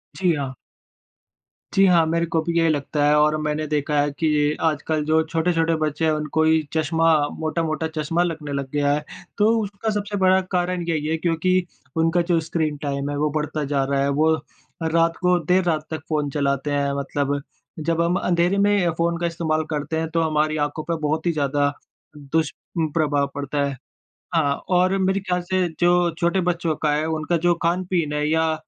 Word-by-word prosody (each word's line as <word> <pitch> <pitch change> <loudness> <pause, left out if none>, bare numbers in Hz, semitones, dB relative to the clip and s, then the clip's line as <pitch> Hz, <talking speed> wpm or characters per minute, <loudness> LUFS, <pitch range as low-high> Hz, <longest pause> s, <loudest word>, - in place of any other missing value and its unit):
जी, 180 -3 +2
हाँ। 135 -2 -3 1.2
जी 195 0 +5
हाँ। 170 -3 +5
मेरे 170 +1 +1
को 165 -1 0
भी 170 +1 -2
यही 165 -1 +3
लगता 145 0 0
है 150 +1 +4
और 150 +1 +3
मैंने 150 0 -1
देखा 150 0 0
है 145 0 0
कि 160 - +1 0.4
आजकल 155 0 0
जो 160 +1 +3
छोटे-छोटे 165 0 +1
बच्चे 155 +1 -1
हैं 160 - +3
उनको 155 +1 0
ही 160 0 +4
चश्मा 160 +1 +1 0.3
मोटा-मोटा 160 0 -1
चश्मा 165 +3 +1
लगने 155 -4 -4
लग 140 -1 -3
गया 145 -1 +2
है। 150 +1 -1 0.3
तो 210 +1 +4
उसका 205 +2 -4
सबसे 205 -1 -3
बड़ा 190 0 +4
कारण 180 -1 0
यही 155 -3 -1
है 160 +1 0
क्योंकि 175 +2 +1 0.3
उनका 165 +2 +3
जो 170 - +4
स्क्रीन 155 -2 -2
टाइम 140 0 -2
है 145 - -3
वो 150 +1 +1
बढ़ता 155 0 -2
जा 135 - +2
रहा 135 0 0
है। 140 - +1
वो 155 +3 +3 0.5
रात 165 +1 +2
को 180 -1 +3
देर 185 +3 +3
रात 155 -3 0
तक 155 - -3
फ़ोन 150 -2 0
चलाते 140 0 -1
हैं 140 -1 0
मतलब। 140 0 -1 0.4
जब 165 +1 0
हम 170 +1 +1
अँधेरे 175 +2 +1
में 200 -3 +3
फ़ोन 170 0 +1
का 170 - 0
इस्तेमाल 160 -2 -1
करते 150 0 -2
हैं 160 - -2
तो 165 0 0
हमारी 155 -1 +1
आँखों 155 +1 -7
पे 170 - -2
बहुत 155 +2 -1
ही 170 - +3
ज़्यादा 145 -2 +1 0.5
दुष्प्रभाव 150 0 -1
पड़ता 145 0 -2
है। 140 -1 -4 0.6
हाँ 145 -3 +2 0.2
और 185 +2 +3
मेरे 190 +1 +1
ख़्याल 180 -2 -1
से 185 -1 +2
जो 175 0 +4
छोटे 175 +3 +2
बच्चों 170 -2 0
का 150 - +3
है 150 +1 0
उनका 160 +1 0
जो 175 +2 +2
खान-पीन 175 -2 0
है 150 0 0
या 160 0 +2
160 Hz, 190 wpm, -22 LUFS, 150-170 Hz, 1.2 s, जी